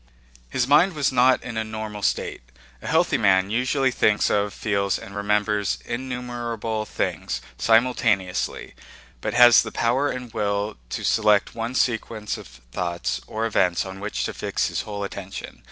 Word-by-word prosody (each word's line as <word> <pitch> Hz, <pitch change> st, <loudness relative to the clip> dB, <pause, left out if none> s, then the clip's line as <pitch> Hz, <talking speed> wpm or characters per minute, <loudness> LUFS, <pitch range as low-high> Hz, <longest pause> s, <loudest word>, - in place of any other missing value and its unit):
His 125 Hz, -, 0 dB
mind 165 Hz, +7 st, +5 dB
was 145 Hz, -3 st, +1 dB
not 130 Hz, 0 st, +4 dB
in 120 Hz, -2 st, -6 dB
a 110 Hz, -, 0 dB
normal 110 Hz, -1 st, -6 dB
state. -, -, -1 dB, 0.4 s
A -, -, -8 dB
healthy 160 Hz, -3 st, +2 dB
man 95 Hz, -2 st, +3 dB
usually 130 Hz, +3 st, +1 dB
thinks 105 Hz, -3 st, +2 dB
of, 105 Hz, 0 st, +1 dB
feels, 100 Hz, -2 st, 0 dB
and 100 Hz, -, -10 dB
remembers 105 Hz, 0 st, 0 dB
innumerable 120 Hz, -3 st, -4 dB
things -, -, -3 dB, 0.2 s
simultaneously, 115 Hz, -5 st, +1 dB, 0.5 s
but -, -, -3 dB
has 120 Hz, -1 st, +8 dB
the -, -, -5 dB
power 130 Hz, +5 st, +1 dB
and 125 Hz, -3 st, -6 dB
will 100 Hz, 0 st, -1 dB
to -, -, -4 dB
select 105 Hz, -2 st, +3 dB
one 115 Hz, +2 st, -4 dB
sequence 115 Hz, -4 st, -1 dB
of -, -, -11 dB
thoughts 65 Hz, +9 st, -4 dB
or 110 Hz, +1 st, -2 dB
events 90 Hz, -6 st, +1 dB
on 95 Hz, 0 st, -8 dB
which 105 Hz, +2 st, -3 dB
to -, -, -3 dB
fix -, -, -1 dB
his -, -, -2 dB
whole 100 Hz, -1 st, -4 dB
attention. 100 Hz, -1 st, -7 dB
110 Hz, 155 wpm, -24 LUFS, 100-125 Hz, 0.5 s, has